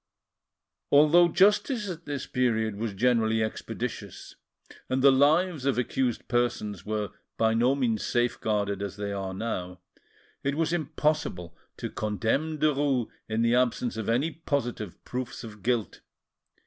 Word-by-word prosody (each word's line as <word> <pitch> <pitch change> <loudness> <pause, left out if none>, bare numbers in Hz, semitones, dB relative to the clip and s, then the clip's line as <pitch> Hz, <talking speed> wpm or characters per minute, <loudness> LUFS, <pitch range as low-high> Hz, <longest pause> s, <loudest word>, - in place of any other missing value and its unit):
Although 155 +4 +7
justice 210 - +3
at 170 -3 -6
this 145 -2 -4
period 110 -4 0
was 105 -1 -4
generally 115 0 +2
expeditious, 110 - -5 0.5
and 130 0 0
the 140 - +8
lives 155 +3 +3
of 135 - +2
accused 125 -1 -1
persons 120 -5 -1
were 105 -2 -2 0.3
by 110 0 +3
no 120 +4 +3
means 115 -6 0
safe 120 0 0
guarded 100 -2 0
as 100 -1 -4
they 100 0 -3
now 95 +1 -4
are, 90 -5 -3 0.7
it 140 0 0
was 165 +1 0
impossible 150 - -1 0.2
to - - -5
condemn 110 - -1
Derues 140 -5 +1 0.2
in 110 +1 +1
the 115 0 +3
absence 125 -1 +1
of 110 -1 -3
any 130 +8 +1
positive 125 - -3
proofs 125 0 -5
of 105 -2 -10
guilt. 120 -2 -1
120 Hz, 140 wpm, -27 LUFS, 110-145 Hz, 0.7 s, the